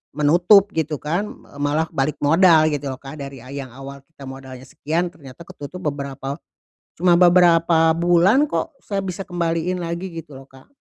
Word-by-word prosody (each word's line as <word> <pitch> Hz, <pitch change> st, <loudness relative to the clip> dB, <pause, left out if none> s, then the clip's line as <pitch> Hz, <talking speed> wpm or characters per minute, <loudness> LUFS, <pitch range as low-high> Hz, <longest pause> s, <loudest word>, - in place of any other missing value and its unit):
menutup 175 Hz, +7 st, +4 dB
gitu 160 Hz, -1 st, -1 dB
kan, 170 Hz, +7 st, -2 dB, 0.2 s
eee, 145 Hz, -, -14 dB
malah 155 Hz, +2 st, 0 dB
balik 135 Hz, +2 st, 0 dB
modal 160 Hz, 0 st, +5 dB
gitu 145 Hz, -1 st, -3 dB
loh, 130 Hz, -, -8 dB
Kak. 140 Hz, +2 st, -10 dB
Dari, 135 Hz, -1 st, -9 dB
ah, 130 Hz, -, -12 dB
yang 140 Hz, -3 st, -7 dB
awal 135 Hz, +2 st, -11 dB
kita 140 Hz, -1 st, -17 dB
modalnya 130 Hz, -1 st, -10 dB
sekian, 165 Hz, +6 st, -2 dB
ternyata 140 Hz, +1 st, -13 dB
ketutup 145 Hz, +6 st, -9 dB
beberapa 140 Hz, 0 st, -6 dB, 0.6 s
cuma 175 Hz, +1 st, +2 dB
beberapa 170 Hz, -2 st, +4 dB
bulan 175 Hz, -, +3 dB
kok, 325 Hz, -3 st, -3 dB
saya 200 Hz, -1 st, -3 dB
bisa 190 Hz, 0 st, -5 dB
kembaliin 175 Hz, 0 st, -2 dB
lagi 170 Hz, +2 st, -5 dB
gitu 160 Hz, -4 st, -10 dB
loh, 135 Hz, -, -11 dB
Kak. 135 Hz, 0 st, -19 dB
160 Hz, 170 wpm, -21 LUFS, 140-175 Hz, 0.6 s, modal